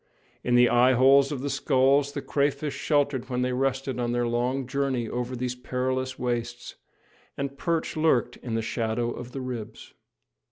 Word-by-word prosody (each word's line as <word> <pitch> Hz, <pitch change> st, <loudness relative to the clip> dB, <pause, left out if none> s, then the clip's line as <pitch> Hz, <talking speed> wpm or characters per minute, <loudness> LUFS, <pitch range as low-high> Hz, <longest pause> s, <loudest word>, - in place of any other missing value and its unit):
In 125 Hz, -, +2 dB
the 120 Hz, 0 st, +6 dB
eyeholes 130 Hz, +3 st, +5 dB
of 140 Hz, -4 st, -3 dB
the 145 Hz, -, -2 dB
skulls 135 Hz, +2 st, +2 dB
the -, -, -4 dB
crayfish 140 Hz, +1 st, 0 dB
sheltered 145 Hz, -4 st, 0 dB
when 125 Hz, 0 st, -1 dB
they 125 Hz, 0 st, 0 dB
rested 135 Hz, 0 st, -1 dB
on 120 Hz, -1 st, -1 dB
their 120 Hz, 0 st, 0 dB
long 125 Hz, +3 st, -1 dB
journey 135 Hz, -2 st, -1 dB
over 125 Hz, +2 st, -3 dB
these 125 Hz, 0 st, -2 dB
perilous 130 Hz, +1 st, -2 dB
wastes, 120 Hz, -1 st, -3 dB, 0.6 s
and 140 Hz, 0 st, -3 dB
perch 165 Hz, +2 st, -1 dB
lurked 145 Hz, -6 st, +2 dB
in 115 Hz, -3 st, -5 dB
the 115 Hz, -, -1 dB
shadow 115 Hz, +1 st, -1 dB
of 125 Hz, +1 st, -8 dB
the 135 Hz, -, -5 dB
ribs. 120 Hz, -4 st, -7 dB
130 Hz, 165 wpm, -26 LUFS, 120-135 Hz, 0.6 s, the